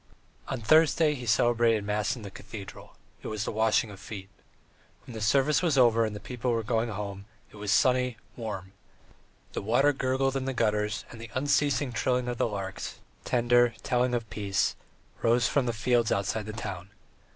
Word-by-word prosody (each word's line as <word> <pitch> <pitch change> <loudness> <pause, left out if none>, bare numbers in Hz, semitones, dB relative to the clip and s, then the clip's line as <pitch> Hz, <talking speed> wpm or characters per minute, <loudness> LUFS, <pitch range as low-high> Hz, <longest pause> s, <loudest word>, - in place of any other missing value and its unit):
IV - - -6
On 130 - -4
Thursday 155 +4 +4
he 125 -4 -7
celebrated 115 0 +3
mass 105 +2 0
in 120 - -10
the 100 - -7
cathedral; 100 0 -10 0.3
it - - -7
was 110 -1 -3
the - - -2
Washing 110 +1 +2
of 100 - -11
Feet. 100 -3 -8 0.8
When 125 - -10
the 110 - -6
service 135 +8 +3
was 165 -6 +1
over 115 -3 +5
and 110 -1 -4
the - - -6
people 125 +1 -4
were 115 -1 0
going 115 +1 0
home, 100 -1 -5 0.3
it - - -14
was 105 -1 -2
sunny, 125 +2 +3 0.2
warm; 100 -5 -6 0.8
the - - -3
water 135 +8 +3
gurgled 135 0 0
in 135 -1 -1
the 135 - -2
gutters, 105 -1 0
and 115 - -10
the 115 - -8
unceasing 145 0 +1
trilling 125 +1 0
of 120 -1 -3
the - - +2
larks, 100 -3 -5 0.3
tender, 120 0 +3
telling 125 0 +1
of 115 -2 -3
peace, 100 -2 0 0.5
rose 115 -1 +3
from 135 -4 +1
the - - +2
fields 115 +1 +1
outside 100 +2 -1
the 110 - -5
town. 100 -4 -6
115 Hz, 185 wpm, -28 LUFS, 105-125 Hz, 0.8 s, over